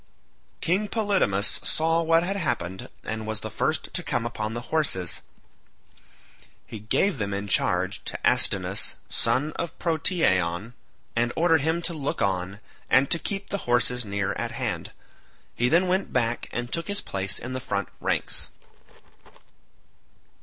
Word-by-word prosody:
King 190 +5 +2
Polydamas 195 - +2
saw 165 +1 +2
what 165 0 +4
had 195 +3 -1
happened, 95 - -2
and 110 0 -4
was 110 -1 -2
the - - -4
first - - -1
to - - -1
come 115 - -1
up 120 - -4
to 110 0 -1
the 115 +2 -4
horses; 95 - +1 1.4
he 110 - -8
gave 135 - +1
them 100 -1 -1
in 100 +1 -3
charge 95 0 +2
to - - -2
Astynous - - +2
son 150 +4 +1
of 170 - -4
Protiaon, 110 - +1 0.4
and 120 +1 +2
ordered 165 -2 +4
him 160 +3 0
to 170 - 0
look 145 -3 -3
on, 95 0 -1 0.3
and 130 +1 +4
to 170 - +4
keep 195 +6 -4
the 200 - -1
horses 125 0 +3
near 100 -2 -1
at - - -3
hand. - - -3 0.6
He 120 +1 +2
then 175 +5 +4
went 185 +2 0
back 120 -1 0
and 120 0 -4
took 165 - -2
his 205 0 +1
place 95 0 -1
in 125 - -5
the 130 - -2
front 100 -5 -2
ranks. - - -1
125 Hz, 155 wpm, -26 LUFS, 100-165 Hz, 1.4 s, what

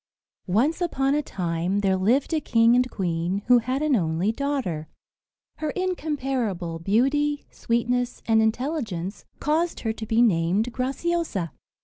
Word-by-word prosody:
Once 255 - +1
upon 275 -5 +1
a 300 - +2
time 180 - -2
there 190 -1 +2
lived 235 - +1
a 310 - +1
king 230 -1 +4
and 250 0 +2
queen, 180 0 -2
who 245 0 +6
had 255 +5 -2
an 305 -3 +3
only 170 +1 +1
daughter. 225 - -2 0.7
Her 310 - -2
incomparable 265 - -2
beauty, 275 - +1
sweetness, 245 +1 -1
and 220 -1 +4
intelligence 220 - -2
caused 325 +3 0
her 225 -1 -1
to 220 - -7
be 225 +1 +4
named 200 +3 +2
Graciosa. 270 - -1
235 Hz, 135 wpm, -25 LUFS, 190-280 Hz, 0.7 s, who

